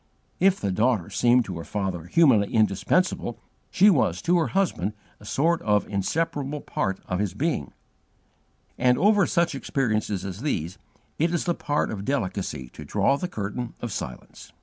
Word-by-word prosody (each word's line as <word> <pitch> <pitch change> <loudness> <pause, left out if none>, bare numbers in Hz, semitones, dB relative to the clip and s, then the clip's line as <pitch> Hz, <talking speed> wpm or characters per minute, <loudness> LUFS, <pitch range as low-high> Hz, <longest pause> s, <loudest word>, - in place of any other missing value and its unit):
If 195 0 +4
the 100 - -1
daughter 110 -2 +1
seemed 120 0 +3
to 90 -4 -6
her - - -6
father 95 -5 -3
humanly 115 - +4
indispensable, 115 - +1 0.3
she 205 +3 +5
was 95 - +2
to 175 +1 +3
her 160 - +1
husband 175 - 0 0.3
a 105 - -15
sort 165 +9 +1
of 105 -5 +1
inseparable 145 - -2
part 95 0 -2
of 90 - -2
his 100 -3 -2
being; 140 - -1 1.1
and 125 0 +4
over 200 +3 +4
such 170 -2 +1
experiences 110 -8 -1
as 95 +2 -6
these 90 - -2 0.4
it 165 +2 +2
is 175 - 0
the 175 - +1
part 150 -2 -1
of 100 -2 -5
delicacy 95 - -2
to 75 - -10
draw 100 - +2
the 180 +6 -3
curtain 110 - -5
of 120 - -5
silence. 65 -8 -7
120 Hz, 165 wpm, -25 LUFS, 95-160 Hz, 1.1 s, she